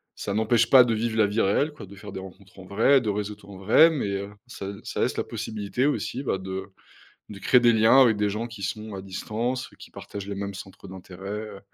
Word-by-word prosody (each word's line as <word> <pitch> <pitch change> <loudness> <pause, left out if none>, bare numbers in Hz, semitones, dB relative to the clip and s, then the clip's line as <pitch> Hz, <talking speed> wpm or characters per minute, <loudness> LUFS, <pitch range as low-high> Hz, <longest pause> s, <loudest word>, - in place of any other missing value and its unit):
ça 100 - -4
n'empêche 110 +2 +2
pas 130 -2 +9
de 120 -2 0
vivre 110 0 -2
la 105 -2 +4
vie 105 +3 -2
réelle, 140 +10 +2
quoi, 145 - -10
de 100 +2 -13
faire 100 +1 -10
des 95 - -6
rencontres 95 0 -13
en 95 - -11
vrai, 115 +8 +4
de 110 - -2
réseauter 105 0 -5
en 100 -1 -10
vrai, 115 - +6
mais, 145 -9 -2
heu, 100 +1 -6 0.2
ça 100 -5 -7 0.2
ça - - -4
laisse - - 0
la - - 0
possibilité 110 +4 -3
aussi, 140 -2 -1
bah, 95 - -1
de 95 0 -5 0.7
de 100 -2 -9
créer 125 +5 +4
des 120 -1 +5
liens 110 +4 +6
avec 110 -4 +3
des 105 0 +1
gens 105 +3 -3
qui 115 -4 -11
sont 105 +2 -4
à 95 - -6
distance, 115 +6 -3
qui - - -12
partagent 100 -1 -8
les 100 - -4
mêmes 100 0 -4
centres 95 0 -11
d'intérêt, 95 0 -10
heu. 105 -1 -6
105 Hz, 240 wpm, -25 LUFS, 100-115 Hz, 0.7 s, pas